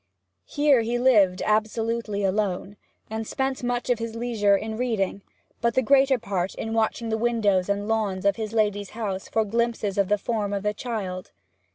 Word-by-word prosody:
Here 290 -4 +3
he 235 +2 -1
lived 210 -7 +4
absolutely 215 0 0
alone, 195 0 -1 0.3
and 220 0 -4
spent 265 -1 -2
much 245 0 -2
of 240 - +1
his 230 0 -4
leisure 225 -4 +2
in 220 +2 -5
reading, 220 -5 -1 0.4
but 235 -1 +1
the 260 - +3
greater 270 +2 +4
part 195 -4 -3
in 225 - -4
watching 225 +1 0
the 220 0 -1
windows 210 -5 +1
and 200 +1 -1
lawns 210 -4 -1
of 200 - +4
his 220 -2 -4
lady's 205 -3 0
house 195 -4 -3
for 220 -1 +1
glimpses 225 -2 -1
of 195 - +3
the 210 - +2
form 205 -1 -2
of 200 -1 -2
the 210 0 0
child. 200 -6 -5
220 Hz, 180 wpm, -25 LUFS, 200-235 Hz, 0.4 s, lived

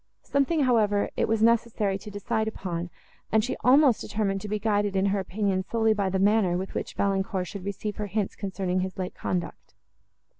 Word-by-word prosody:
Something, 285 +3 +1
however, 215 -6 +2
it - - +1
was 220 0 +1
necessary 225 -4 +2
to 210 - -9
decide 220 +2 -2
upon, 175 -5 -4 0.4
and 220 0 +3
she 250 - -2
almost 265 -1 +5
determined 195 -2 -1
to 210 - -6
be 210 +1 -1
guided 205 -1 0
in 190 0 +2
her 200 - +1
opinion 195 0 -1
solely 220 +2 +2
by 200 -2 0
the 190 - 0
manner, 195 -2 +3
with 190 +1 -5
which - - -4
Valancourt 195 -1 0
should 195 +1 -8
receive 200 +1 -4
her 210 - -3
hints 205 0 -2
concerning 190 -2 -2
his 185 +2 -3
late 185 -1 -3
conduct. 180 -2 -4
205 Hz, 190 wpm, -27 LUFS, 190-220 Hz, 0.4 s, almost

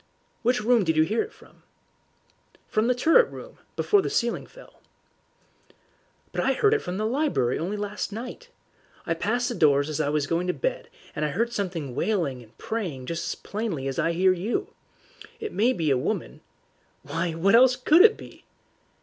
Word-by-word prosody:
"Which 245 0 +1
room 235 -1 +4
did 160 -3 0
you 155 - +6
hear 210 +8 0
it 430 - -5
from?" - - -20 1.1
"From 215 +2 +1
the 250 - +2
turret 330 - +4
room, - - -11 0.2
before 410 -1 +3
the - - -3
ceiling 235 0 -1
fell." - - -17 1.5
"But - - -2
I - - +2
heard 430 -3 +3
it 440 - +1
from 180 +1 -5
the 215 - -1
library 250 - 0
only 190 +6 -3
last 205 +1 -4
night. 250 - -8 0.6
I 165 - 0
passed 240 +8 -1
the 245 - -2
doors 145 -6 +3
as 155 0 -1
I 145 - 0
was 150 -1 0
going 170 +4 -1
to 180 - +1
bed, - - -3 0.3
and 150 - -2
I - - +2
heard 230 +10 -1
something 175 - -3
wailing 150 - -1
and 115 -1 -19
praying 175 - -4
just 165 +4 -4
as - - -2
plainly 200 -11 -4
as 135 +4 -3
I 165 +1 +1
hear 185 +2 +4
you. 240 - -3 0.7
It 435 -1 -5
may 235 +5 +3
be 165 - 0
a 135 - +3
woman - - -3 0.3
" - - -40
"Why, 170 0 -2
what 175 +5 +2
else 250 +2 +6
COULD 305 +7 +5
it 440 +2 +6
be?" - - -13
205 Hz, 190 wpm, -25 LUFS, 160-250 Hz, 1.5 s, you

